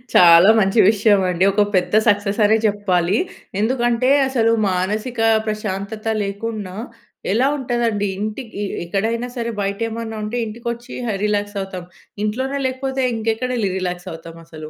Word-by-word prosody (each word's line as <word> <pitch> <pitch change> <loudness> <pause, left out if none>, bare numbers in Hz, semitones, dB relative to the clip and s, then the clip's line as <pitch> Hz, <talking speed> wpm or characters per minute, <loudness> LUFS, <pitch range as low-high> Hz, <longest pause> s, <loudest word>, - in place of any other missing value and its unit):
చాలా 170 +3 +8
మంచి 195 +3 +2
విషయవండి. 195 -4 +2
ఒక 210 +1 +4
పెద్ద 180 +2 +1
సక్ససనే 205 +1 +3
చెప్పాలి. 195 -2 +1 0.4
ఎందుకంటే, 240 +1 +1 0.2
అసలు 235 -4 +2 0.2
మానసికా 215 +6 -1 0.2
ప్రశాంతత 215 0 -4 0.2
లేకున్నా 200 -1 -5 0.6
ఎలా 250 +6 +3
ఉంటదండి, 235 -5 -1
ఇంటికీ 215 0 -5 0.2
ఎక్కడైనా 225 +6 -1
సరే 235 0 -2
బయటేమన్నా 225 +2 -3
ఉంటే 225 +3 -3
ఇంటికొచ్చీ 235 +2 -6
హ 215 - -1
రిలాక్సవుతాం. 205 -3 -2 0.4
ఇంట్లోనే 260 +6 -2
లేకపోతే 265 +1 -3
ఇంకెక్కడెళ్ళి 225 -1 -1
రిలాక్సవుతామసలు. 165 -3 -7
210 Hz, 105 wpm, -20 LUFS, 195-230 Hz, 0.6 s, చాలా